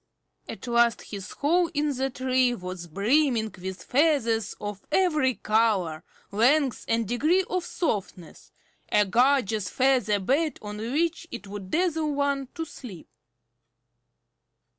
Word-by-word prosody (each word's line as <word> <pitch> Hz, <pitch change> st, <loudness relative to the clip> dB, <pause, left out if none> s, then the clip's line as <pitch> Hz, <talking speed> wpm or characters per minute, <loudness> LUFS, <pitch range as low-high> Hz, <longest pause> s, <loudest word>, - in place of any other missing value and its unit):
At -, -, -7 dB
last 235 Hz, -1 st, +2 dB
his 200 Hz, -2 st, -6 dB
hole 340 Hz, +4 st, +1 dB
in 295 Hz, -1 st, 0 dB
the 265 Hz, +1 st, -1 dB
tree 255 Hz, -1 st, +1 dB
was 180 Hz, -3 st, -7 dB
brimming 225 Hz, -, +1 dB
with 190 Hz, 0 st, -6 dB
feathers 245 Hz, -8 st, +1 dB
of 205 Hz, -1 st, -6 dB
every 305 Hz, -9 st, +2 dB
color, 205 Hz, -7 st, +1 dB, 0.3 s
length, 255 Hz, +5 st, +2 dB
and 230 Hz, -1 st, 0 dB
degree 310 Hz, -, +2 dB
of 365 Hz, -1 st, -1 dB
softness, 200 Hz, -, -4 dB, 0.4 s
a 210 Hz, 0 st, +4 dB
gorgeous 225 Hz, -2 st, +2 dB
feather 255 Hz, -6 st, +2 dB
bed 280 Hz, -, 0 dB
on 210 Hz, 0 st, -7 dB
which 315 Hz, +9 st, -1 dB
it 210 Hz, -, -7 dB
would 200 Hz, -1 st, -8 dB
dazzle 320 Hz, -, 0 dB
one 280 Hz, -1 st, 0 dB
to 325 Hz, -, -3 dB
sleep. 215 Hz, -, -11 dB
245 Hz, 125 wpm, -26 LUFS, 205-290 Hz, 0.4 s, a